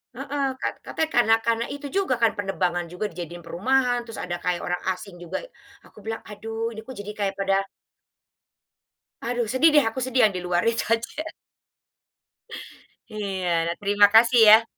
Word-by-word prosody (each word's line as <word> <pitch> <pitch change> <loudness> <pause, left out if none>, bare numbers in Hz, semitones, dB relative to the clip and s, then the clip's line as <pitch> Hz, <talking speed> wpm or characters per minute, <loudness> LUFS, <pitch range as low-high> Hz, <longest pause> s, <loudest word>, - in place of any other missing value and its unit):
Heeh, 275 +2 -2 0.2
kat - - -2
katanya 320 0 -2
karena 225 -2 +5
karena 230 0 +1
itu 285 0 -6
juga 385 -9 +1
kan 230 - +5
penerbangan 180 -3 -1
juga 180 +5 -4
dijadiin 175 0 -8
perumahan 245 +7 0
terus 225 - -7
ada 175 -1 -3
kayak 175 0 -2
orang 180 - -2 0.2
asing 185 -1 -11
juga 175 -1 -5 0.4
aku - - -21
bilang, 225 0 -4
"Aduh 225 +2 -4
ini 220 -1 -9
kok 260 - -8
jadi 205 +1 -7
kayak 195 -1 -1
pada" 195 0 0 1.7
Aduh 240 0 -1
sedih 310 +5 +5
deh 295 - +7
aku 240 +4 -6
sedih 260 0 +2
yang 210 - +1
di 180 - -3
luar 175 0 +1
itu 230 - -2
aja. 230 +6 -3 1.9
Iya, 195 -4 -3 0.2
nah 170 - -2
terima 205 0 +5
kasih 235 +2 +6
ya. 220 +1 +9
215 Hz, 165 wpm, -24 LUFS, 185-240 Hz, 1.9 s, ya